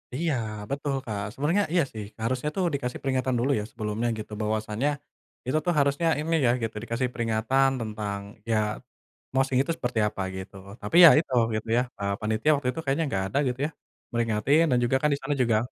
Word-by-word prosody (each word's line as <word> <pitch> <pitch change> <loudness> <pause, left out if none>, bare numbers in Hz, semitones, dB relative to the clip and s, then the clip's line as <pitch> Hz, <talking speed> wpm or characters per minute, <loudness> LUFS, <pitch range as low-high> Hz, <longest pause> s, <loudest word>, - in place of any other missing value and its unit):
Iya 160 0 0 0.4
betul 140 0 -1
Kak, 105 -3 -3
sebenarnya 165 +9 +1
iya 170 -3 +4
sih, 105 -2 -5 0.2
harusnya 130 +5 0
tuh 185 -2 +1
dikasih 125 -3 -3
peringatan 130 -1 0
dulu 135 +4 +1
ya - - -3
sebelumnya 110 +1 -2
gitu. 105 - -8
Bahwasanya 110 +4 -1 0.6
itu 140 +5 +1
tuh 175 - +2
harusnya 140 +4 +2
ini 165 +2 0
ya 120 - +5
gitu 115 0 -3
dikasih 120 +2 -1
peringatan 115 +4 +2
tentang 105 -2 -4 0.3
ya 110 - +3 0.8
moshing 135 -1 +2
itu 165 - -2
seperti 120 -3 -1
apa 100 - -5
gitu. 95 +1 -8 0.3
Tapi 105 +10 0
ya - - +12
itu 140 -5 -4 0.2
gitu 110 +1 -3
ya, 125 - +3 0.2
eee, 100 0 -1
panitia 110 +7 +1
waktu 140 -3 -3
itu 165 - -6
kayaknya 140 +4 +1
enggak 95 -6 -1
ada 140 - -1
gitu 125 +1 -2
ya, - - -10 0.4
meringatin 120 +7 +2
dan 125 - +4
juga 120 +2 +2
kan 150 - +3
disana 140 +1 -3
juga 115 -2 +2
125 Hz, 190 wpm, -26 LUFS, 110-140 Hz, 0.8 s, ya